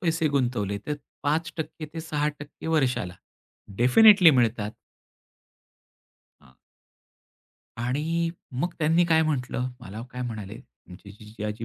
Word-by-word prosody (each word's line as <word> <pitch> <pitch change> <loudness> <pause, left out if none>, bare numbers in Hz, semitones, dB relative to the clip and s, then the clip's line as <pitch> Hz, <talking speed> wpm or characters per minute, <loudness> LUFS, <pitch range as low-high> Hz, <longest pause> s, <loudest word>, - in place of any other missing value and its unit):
पैसे 165 -3 +1
गुंतवले, 120 -8 0
तर 150 - -1 0.3
5% 160 +1 -2
ते 165 - -4
6% 150 -2 -4
वर्षाला 130 - 0 0.6
डेफिनिटली 180 - +7
मिळतात. 115 -5 +1 1.7
हां. - - -22 1.2
आणि 150 +8 -1 0.3
मग 175 - -1
त्यांनी 165 +2 +3
काय 160 -1 +4
म्हटलं, 130 -4 -1
मला 110 0 -8
काय 125 - -4
म्हणाले, 110 -4 -6 0.3
आमचे 90 +3 -12
जिजाजी 105 +1 -7
140 Hz, 105 wpm, -26 LUFS, 115-160 Hz, 1.7 s, डेफिनिटली